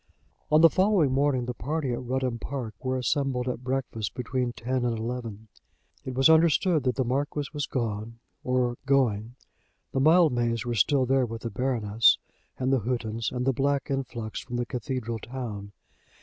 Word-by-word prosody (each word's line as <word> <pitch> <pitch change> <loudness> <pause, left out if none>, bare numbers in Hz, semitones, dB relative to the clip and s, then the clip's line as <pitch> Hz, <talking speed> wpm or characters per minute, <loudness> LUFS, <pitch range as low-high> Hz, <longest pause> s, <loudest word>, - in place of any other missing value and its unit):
On 155 +1 +6
the 165 - +9
following 185 -6 +3
morning 135 -2 +1
the 125 - -3
party 140 +1 -2
at - - -3
Rudham 125 -1 -2
Park 125 -5 -5
were 130 0 0
assembled 130 0 0
at 125 0 -3
breakfast 125 -5 -3
between 125 0 -2
ten 125 +1 -2
and 120 -2 0
eleven. 115 -2 -5 0.6
It 130 - -5
was 135 +3 +5
understood 160 -1 +4
that 125 - +1
the 130 - +1
Marquis 140 +3 -1
was 145 -1 -2
gone, 115 -2 -3 0.3
or 125 -1 0
going. 120 -4 +1 0.6
The 135 - 0
Mildmays 125 -7 +3
were 120 - -1
still 130 +5 +3
there 130 0 +2
with 115 0 -7
the 115 - -3
Baroness, 115 -3 +3 0.4
and 130 +1 0
the 135 - +3
Houghtons, 115 -1 -2
and 125 0 -2
the 135 - +3
black 140 +2 0
influx 120 -5 -3
from 120 - -7
the 120 0 -1
cathedral 120 -1 -4
town. 110 -5 -6
125 Hz, 170 wpm, -27 LUFS, 115-135 Hz, 0.6 s, the